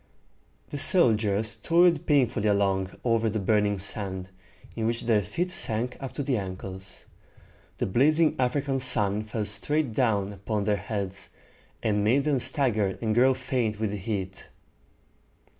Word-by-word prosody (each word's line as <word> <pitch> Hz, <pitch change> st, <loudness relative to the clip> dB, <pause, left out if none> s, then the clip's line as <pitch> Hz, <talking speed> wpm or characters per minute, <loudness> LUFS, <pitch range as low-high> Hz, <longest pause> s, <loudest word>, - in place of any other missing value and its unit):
The 145 Hz, -, -4 dB
soldiers 110 Hz, -, +3 dB
toiled 170 Hz, +6 st, +2 dB
painfully 125 Hz, -7 st, +2 dB
along 95 Hz, -2 st, 0 dB
over 115 Hz, -2 st, +1 dB
the 110 Hz, -, -3 dB
burning 105 Hz, 0 st, +1 dB
sand, 95 Hz, -1 st, -2 dB, 0.5 s
in 110 Hz, -1 st, -1 dB
which 115 Hz, 0 st, -2 dB
their 115 Hz, -3 st, +2 dB
feet 170 Hz, -, -3 dB
sank 120 Hz, -6 st, 0 dB
up 135 Hz, -3 st, -6 dB
to 145 Hz, -, -3 dB
the 130 Hz, -2 st, 0 dB
ankles. 95 Hz, -1 st, -8 dB, 0.7 s
The -, -, -1 dB
blazing 155 Hz, -, +3 dB
African 135 Hz, +2 st, 0 dB
sun 105 Hz, -5 st, +1 dB
fell 110 Hz, 0 st, -3 dB
straight 145 Hz, +7 st, -1 dB
down 105 Hz, -5 st, 0 dB
upon 100 Hz, +1 st, -3 dB
their 105 Hz, 0 st, +1 dB
heads, 100 Hz, -1 st, -5 dB, 0.5 s
and 105 Hz, -2 st, +1 dB
made 125 Hz, +7 st, +3 dB
them 145 Hz, -3 st, +1 dB
stagger 120 Hz, -6 st, +1 dB
and 110 Hz, -2 st, -1 dB
grow 130 Hz, +3 st, +4 dB
faint 125 Hz, -5 st, -2 dB
with 110 Hz, -2 st, -1 dB
the 105 Hz, -, -4 dB
heat. 95 Hz, -1 st, -5 dB
110 Hz, 145 wpm, -26 LUFS, 100-130 Hz, 0.7 s, grow